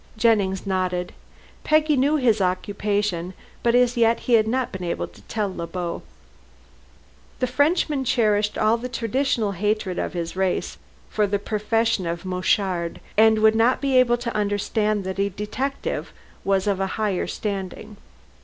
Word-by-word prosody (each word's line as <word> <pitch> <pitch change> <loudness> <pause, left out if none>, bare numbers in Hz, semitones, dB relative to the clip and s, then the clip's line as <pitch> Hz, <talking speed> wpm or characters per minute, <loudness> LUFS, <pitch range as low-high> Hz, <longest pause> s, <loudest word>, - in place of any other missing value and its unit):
Jennings 205 -4 +2
nodded. 185 -2 -1 0.5
Peggy 305 0 +3
knew 280 +3 +2
his 235 -8 +2
occupation, 190 -1 -1 0.3
but 235 0 +2
as 245 0 +3
yet 230 -1 +3
he 245 - -1
had 220 -1 +5
not 255 +2 -1
been 190 -2 -6
able 170 - -2
to - - -18
tell 205 -4 -2
Le 170 - -4
Beau. 175 0 -4 1.4
The 255 - 0
Frenchman 285 +2 +1
cherished 215 -5 +1
all 220 +2 +3
the 250 +2 -6
traditional 235 -2 0
hatred 200 -1 -1
of - - -3
his 170 -1 -4
race 190 -1 -1 0.3
for 210 -1 0
the 205 +1 0
profession 215 -1 0
of 170 +2 -4
"mouchard," 185 -1 0 0.2
and 220 +1 +5
would 220 0 +6
not 230 +3 +3
be 275 -2 0
able 245 -1 +5
to 240 -1 -5
understand 210 0 0
that 190 +1 -5
a 200 0 +2
detective 215 +8 -4 0.3
was 195 -1 +1
of 200 -2 0
a 195 - 0
higher 210 -4 0
standing. 200 0 -5
210 Hz, 155 wpm, -23 LUFS, 190-235 Hz, 1.4 s, would